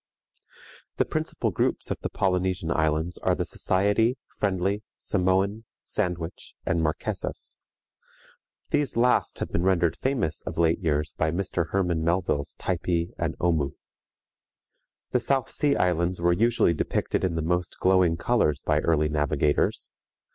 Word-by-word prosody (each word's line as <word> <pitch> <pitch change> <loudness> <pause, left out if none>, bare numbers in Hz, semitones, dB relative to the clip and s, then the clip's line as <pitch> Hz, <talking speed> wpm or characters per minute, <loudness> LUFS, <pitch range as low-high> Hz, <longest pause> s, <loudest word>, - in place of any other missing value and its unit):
The - - +2
principal - - -2
groups - - -1
of - - -2
the - - -3
Polynesian 90 -3 0
Islands 80 +2 0
are - - +1
the - - -2
Society, 105 +6 +1 0.2
Friendly, 100 +1 0 0.2
Samoan, 95 +4 0
Sandwich, 85 -1 -4
and 85 - +1
Marquesas. 80 -1 -3 1.1
These 145 -5 0
last 125 +1 +2
have - - -4
been 85 - 0
rendered 85 -3 +2
famous 130 - -1
of - - -6
late 85 -1 +3
years 75 -3 0
by 80 - 0
Mr. 85 -1 -2
Hermann 90 -4 0
Melville's 85 -4 0
Typee 85 -1 -1
and 80 -1 -1
Omoo. 75 -5 +1 1.4
The 125 - +3
South 135 +1 0
Sea 145 -1 +2
Islands 90 0 +1
were 85 0 +3
usually 115 -2 +3
depicted 75 - -1
in 90 -3 0
the 80 - -1
most 90 +1 -1
glowing 95 -3 +3
colors 85 - +1
by 75 -1 +2
early 75 -1 +2
navigators. 75 -1 0
85 Hz, 135 wpm, -26 LUFS, 80-95 Hz, 1.4 s, late